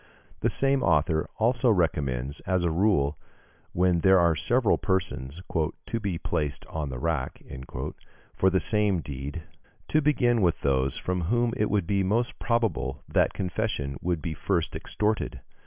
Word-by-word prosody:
The - - +1
same 135 0 +2
author 80 -2 +2
also 120 +2 +2
recommends, 70 - 0
as 95 -1 +1
a 85 - +1
rule, 80 -6 +2 0.5
when 90 -1 +2
there 95 +2 +5
are 85 -2 +4
several 120 +6 +2
persons 90 -4 -2 0.4
"to 115 - -2
be 100 -6 -2
placed 75 -3 -2
on 75 -3 -4
the 65 - -5
rack" 75 -2 -2 0.9
for 95 - +3
the 95 0 +2
same 105 -5 +2
deed, 70 +3 -6 0.5
to 155 - +3
begin 125 -6 +2
with 85 -3 +2
those 65 -1 +1
from 90 -2 -2
whom 120 +4 +1
it 105 - 0
would 100 -4 +1
be 100 +3 +1
most 115 +6 0
probable 115 -6 -1
that - - +2
confession 90 -7 -2
would 85 -3 -1
be 80 - -2
first 75 - -1
extorted. 105 +1 -2
90 Hz, 155 wpm, -27 LUFS, 75-110 Hz, 0.9 s, there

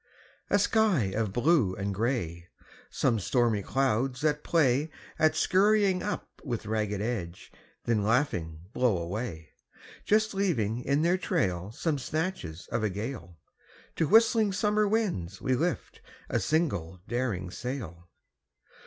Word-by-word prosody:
A - - +4
sky 200 - +2
of 110 -2 0
blue 120 - +2
and 100 0 -3
grey; 95 -7 -2 0.4
Some 120 -4 +1
stormy 115 0 +1
clouds 130 +2 0
that 150 -1 +1
play 145 -2 +2 0.3
At 155 0 +4
scurrying 195 -1 +3
up 210 - -5
with 120 -7 -4
ragged 105 -2 -1
edge, 95 -7 -4 0.3
then 115 -3 +2
laughing 100 - 0
blow 125 -6 +2
away, 85 -2 -5 0.5
Just 215 +1 +2
leaving 125 - 0
in 140 +4 +1
their 175 +2 +2
trail 95 - -1
Some 145 +4 -1
snatches 155 - -4
of - - 0
a 110 - +2
gale; 100 -4 -6 0.6
To 160 - +2
whistling 220 0 +4
summer 210 +1 +2
winds 180 - -1
we 130 - 0
lift 165 +5 -2 0.3
a - - +2
single 115 - -1
daring 115 -8 -2
sail. 95 - -6
125 Hz, 130 wpm, -28 LUFS, 100-170 Hz, 0.6 s, A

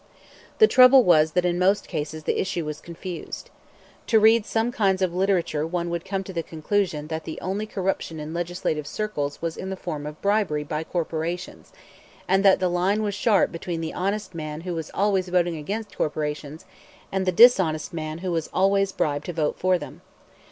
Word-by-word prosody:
The 435 - +8
trouble 255 - +7
was 160 -4 +4
that 180 0 +2
in 175 0 0
most 195 +3 +2
cases 155 -1 -4
the - - 0
issue 175 -3 -2
was 150 0 -5
confused. 170 +1 -8 0.6
To 225 - +5
read 220 0 +5
some 225 +2 0
kinds 195 -5 +1
of 180 -2 0
literature 180 -5 0
one 170 0 -2
would 170 -1 -3
come 195 0 -2
to 190 - -9
the 170 - -1
conclusion 160 -1 -2
that 160 0 -4
the 160 - -6
only 200 +4 -3
corruption 190 -5 -3
in 150 +1 -6
legislative 170 -3 -2
circles 150 -8 -3
was 165 -1 -2
in 190 - -5
the 190 - -3
form 155 -6 -5
of 150 0 -8
bribery 200 -8 +1
by 155 +1 -3
corporations, 170 +1 -4 0.6
and 195 +1 +3
that 195 -1 +6
the 185 - +1
line 185 +4 +1
was 205 -1 -1
sharp 205 0 +2
between 165 0 -4
the 160 - -4
honest 195 +1 -2
man 155 -1 -5
who 180 +1 -4
was 160 -2 -5
always 195 -2 +1
voting 175 -1 +1
against 205 +8 -5
corporations 150 0 -3 0.5
and 190 -1 -1
the - - +4
dishonest 185 -7 +5
man 155 -1 -4
who 180 - -1
was 165 -2 -2
always 195 +1 +2
bribed 145 -4 -1
to 175 - -3
vote 155 -2 -1
for 185 0 +3
them. - - -10
175 Hz, 195 wpm, -24 LUFS, 160-195 Hz, 0.6 s, The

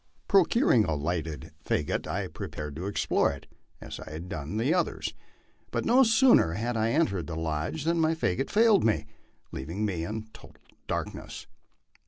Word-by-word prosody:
Procuring 195 - +4
a 80 -5 -1
lighted 80 0 -3
jfagot, - - -1
I - - -2
prepared 75 -1 -6
to 90 +5 -4
explore 100 - +1
it, 70 - -9 0.3
as - - -8
I - - -9
had 80 +4 -7
done 80 +5 -4
the 125 +8 +2
others; 180 - -1 0.6
but - - -2
no 250 +3 +5
sooner 225 - +5
had 115 +6 -2
I 110 0 +1
en 160 +7 +3
tered 95 -4 -4
the 85 - -5
lodge 80 - -2
than 165 +1 +1
my 160 +1 +2
fagot 135 - -1
failed 220 -2 +5
me, 105 -10 +1 0.5
leaving 85 +11 -3
me 90 -5 -2
in 110 +5 -5
total - - -15 0.3
darkness. - - -5
105 Hz, 170 wpm, -28 LUFS, -, 0.6 s, no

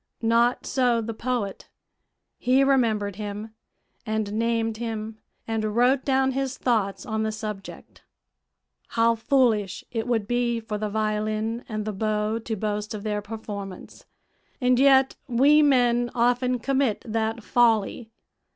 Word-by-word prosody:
Not 235 +2 +2
so 245 -3 +2
the 230 0 -4
poet; 225 -4 -3 0.7
he 255 +2 +3
remembered 220 -7 +1
him, 210 +1 -6 0.5
and 220 -2 -2
named 225 0 0
him, 220 -1 -5 0.3
and 215 -1 -2
wrote 255 +3 +3
down 265 -1 +2
his 270 0 -2
thoughts 220 -1 0
on 220 -3 -2
the 220 0 0
subject. 210 -2 -8 1.0
"How 230 0 +5
foolish 225 -5 +1
it 225 0 -3
would 225 -4 0
be 240 0 0
for 215 -2 -5
the 215 0 -2
violin 215 +2 -1
and 215 -1 -3
the 215 - -3
bow 215 +2 -1
to 225 0 -4
boast 210 +1 -3
of 205 - -7
their 210 -1 -2
performance, 205 -3 -8 0.5
and 250 -1 +3
yet 270 -1 +5
we 280 +5 +5
men 245 -4 +3
often 245 +1 +2
commit 265 -2 0
that 225 0 -2
folly. 225 -1 +2
225 Hz, 135 wpm, -25 LUFS, 215-245 Hz, 1.0 s, How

